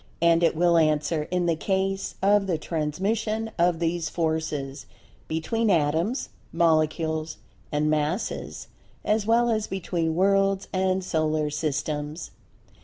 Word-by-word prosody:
And 170 0 +4
it 165 - +3
will 170 +1 +3
answer 155 0 +1
in 180 -1 0
the 170 -1 +2
case 195 +3 -1
of 200 0 +4
the 175 -4 0
transmission 210 +9 -2
of 175 0 +3
these 165 -1 -1
Forces 155 -4 -2 0.4
between 220 +8 -1
Atoms, 165 - +1 0.2
Molecules, 160 -1 +1 0.3
and 150 +1 +1
Masses 155 +6 -2 0.4
as 210 0 +1
well 235 +1 +3
as 215 -1 0
between 170 -4 -2
Worlds 195 +1 +2
and 190 0 +1
Solar 155 -3 0
Systems. 150 +1 -3
170 Hz, 120 wpm, -25 LUFS, 155-195 Hz, 0.4 s, And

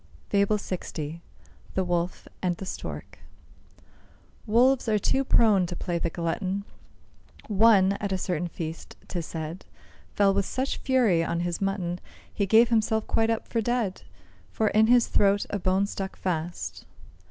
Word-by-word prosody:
FABLE 200 +1 +3
LX. 165 -5 -5 0.6
THE 190 - +2
WOLF 175 0 -2
AND 180 -2 0
THE 195 - -6
STORK. - - -7 1.3
Wolves 245 +3 +3
are 215 - +3
too 265 +6 +1
prone 210 -8 +4
to 175 - -5
play 170 0 -2
the 170 - -1
glutton. 185 +4 -2 0.8
One, 205 -2 +5
at 200 -2 -2
a 190 - +1
certain 175 -2 -2
feast, 165 -1 -7
'tis 170 -3 -4
said, 160 +2 -6 0.5
Fell 200 -1 +4
with 195 -1 0
such 260 +1 -2
fury 235 -11 +2
on 170 +1 -1
his 175 +1 -3
mutton, 185 -3 -1 0.3
He 200 -2 -1
gave 225 +4 +6
himself 220 -1 +1
quite 225 0 +1
up 225 -1 -1
for 230 - -1
dead, 230 -4 -1 0.5
For 220 -1 0
in 215 +1 +4
his 245 0 +5
throat 200 0 +2
a 205 - -1
bone 190 +2 +2
stuck 195 -1 -5
fast. 175 -1 -4
195 Hz, 155 wpm, -26 LUFS, 175-220 Hz, 1.3 s, gave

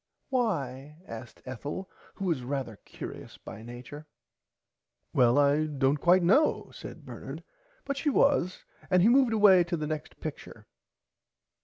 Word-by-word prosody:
Why 150 - -2
asked 115 0 -9
Ethel 145 +9 -5 0.3
who 195 - -4
was 165 -8 0
rarther 125 -4 -4
curious - - -9
by - - -10
nature. 125 +6 -10 1.1
Well 120 0 +4
I 145 +2 +3
dont 140 -1 +1
quite 180 +1 +5
know 245 - +3
said - - -10
Bernard - - -8 0.4
but 280 -1 -2
she 295 +2 0
was 270 -10 +2 0.2
and 180 -2 +4
he 220 - +6
moved 255 -1 +5
away 205 -5 +6
to 170 0 -2
the 155 - -3
next 155 0 -5
picture. 155 -2 -8
155 Hz, 140 wpm, -29 LUFS, 135-195 Hz, 1.1 s, he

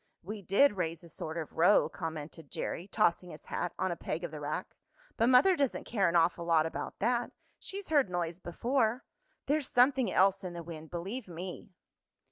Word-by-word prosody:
"We 205 +4 -6
did 200 +5 +4
raise 165 -1 -2
a 170 - -12
sort 160 +1 -5
of 160 -2 -5
row," 180 +5 +5
commented 160 -3 -7
Jerry, 175 - -4
tossing 180 -4 +1
his 155 - -10
hat 175 - -2
on 190 -1 0
a - - -2
peg 165 +1 -4
of 170 - -4
the 155 - -7
rack. 150 +1 -4 0.4
"But 230 - +2
mother 265 +9 +6
doesn't 280 -6 0
care 200 -6 +1
an 170 - -2
awful 170 +1 +3
lot 165 -2 +3
about 160 - -5
that. 240 +2 0 0.3
She's 395 -2 -6
heard 285 -9 +3
noise 175 -1 -2
before. 235 +6 0 0.4
There's 290 -1 0
something 255 0 +4
else 195 +1 +3
in 180 -2 -5
the 170 -1 -6
wind, 160 -1 -9
believe 195 +8 -5
me!" 180 +4 -7
180 Hz, 190 wpm, -31 LUFS, 165-235 Hz, 0.4 s, mother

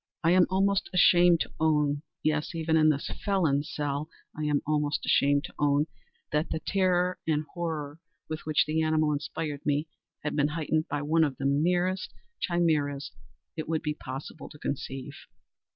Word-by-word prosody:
I 165 - +4
am 180 0 +5
almost 195 +1 +1
ashamed 175 -1 +6
to - - -3
own—yes, 150 +1 0
even 160 0 +1
in 155 -1 +5
this 140 -2 -1
felon's 160 -8 +1
cell, 145 +1 -2 0.3
I 155 - -3
am 145 -1 +1
almost 150 -1 0
ashamed 140 0 +3
to 175 - -8
own—that 150 +1 -1
the 160 - -2
terror 180 0 +1
and 155 -1 +1
horror 160 -4 -4 0.3
with 155 0 -4
which 155 -1 +3
the 155 +1 0
animal 155 -1 +2
inspired 145 0 -4
me, 150 +2 0 0.4
had 150 - -2
been 145 -1 +3
heightened 155 0 -1
by 145 0 -2
one 160 +2 +3
of 145 -4 -1
the 135 - -4
merest 175 +6 +1 0.2
chimaeras 155 -6 0 0.4
it 155 -1 -5
would 160 -1 0
be 150 - -1
possible 135 +2 -8
to - - -13
conceive. 135 -2 -5
155 Hz, 160 wpm, -28 LUFS, 145-165 Hz, 0.4 s, ashamed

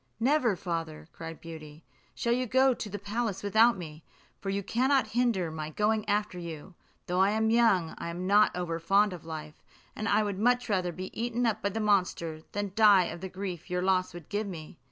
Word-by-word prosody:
"Never, 250 -4 +2
father," 165 -3 -5
cried 165 -1 -8
Beauty, 155 -2 -10 0.3
"shall 235 - 0
you 250 +1 0
go 260 +3 +4
to 220 - -6
the 205 - -4
palace 205 0 -3
without 220 +3 +4
me; 155 -3 -9 0.4
for 195 - -5
you 200 +1 -1
cannot 260 +6 +2
hinder 225 -8 +1
my 155 -1 -5
going 210 +5 0
after 205 -3 0
you. 170 +1 -8 0.3
Though 180 +2 +2
young, 220 -4 +3
I - - -4
am 175 +2 -5
not 205 +1 +4
over 165 -2 -2
fond 195 +4 +3
of 170 -3 -10
life; 155 -2 -8 0.3
and 215 +1 -2
I 215 - +3
would 200 -2 -3
much 245 +3 +2
rather 185 -3 0
be 185 +2 -7
eaten 240 +1 -1
up 220 -1 0
by 200 - 0
the 225 - -4
monster, 180 -6 0
than 205 -1 -2
die 205 -4 +6
of 170 - -10
the 190 - -5
grief 185 -2 -6
your 180 0 -1
loss 185 -1 +2
would 175 -4 -10
give 205 +1 -2
me." 160 -7 -9
195 Hz, 200 wpm, -29 LUFS, 170-220 Hz, 0.4 s, die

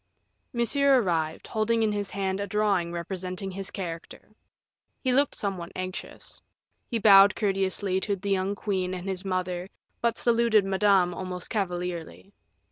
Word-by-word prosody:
Monsieur 270 +3 +3
arrived, 165 -7 -1
holding 225 +1 +1
in 215 - +2
his 205 -1 -2
hand 195 -1 -2
a 200 - -2
drawing 200 -4 +1
representing 185 +2 -4
his 195 +1 -4
character; 170 -2 -7 0.7
he 260 - 0
looked 280 +3 +2
somewhat 185 -4 -4
anxious; 185 0 -6 0.5
he 235 - 0
bowed 200 -2 +7
courteously 195 -1 0
to 200 +1 -1
the 200 +1 -4
young 195 +1 +1
queen 185 -3 -2
and 180 +1 -6
his 190 -1 -2
mother, 185 -1 -2 0.3
but 235 -1 +1
saluted 230 -3 +3
Madame 195 -2 +3
almost 180 0 -4
cavalierly. 180 -2 -3
195 Hz, 140 wpm, -27 LUFS, 185-210 Hz, 0.7 s, bowed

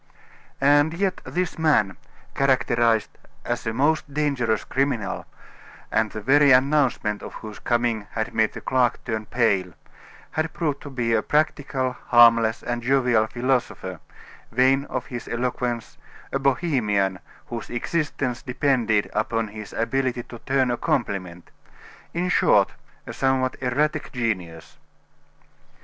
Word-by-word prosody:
And 145 +3 +4
yet 190 +1 -1
this 180 -2 -2
man, 115 -12 +3 0.4
characterized 120 -4 +2 0.3
as - - -3
a - - +1
most 145 +5 +1
dangerous 135 -7 0
criminal, 130 -7 -1 0.6
and 110 -1 +2
the 110 - -7
very 140 +5 +5
announcement 130 -5 +2
of - - -9
whose 110 -1 -9
coming 120 -3 0
had 110 -1 -3
made 110 -1 +2
the - - -7
clerk 125 -2 +1
turn 110 -2 -3
pale, 100 -7 +1 0.6
had 160 +1 -2
proved 150 -4 -2
to 145 - -8
be 120 -4 -1
a - - +3
practical, 140 -4 0
harmless, 115 -1 +5
and 120 0 -2
jovial 125 -3 +2
philosopher, 125 +2 -2 0.5
vain 130 +3 +3
of 130 -3 -4
his 120 -2 -7
eloquence, 120 -1 -3 0.3
a 135 - 0
bohemian 120 - +1 0.3
whose 115 -2 -6
existence 130 -1 -2
depended 125 -5 +1
upon 110 +1 -1
his 105 0 -9
ability 125 +1 -1
to 120 -1 -11
turn 130 -2 +2
a 120 - -1
compliment; 95 -10 -2 0.6
in 175 +2 -1
short, - - +3 0.3
a - - -7
somewhat 130 -1 +1
erratic 145 +4 0
genius. 90 -10 -4
125 Hz, 130 wpm, -24 LUFS, 110-135 Hz, 0.6 s, very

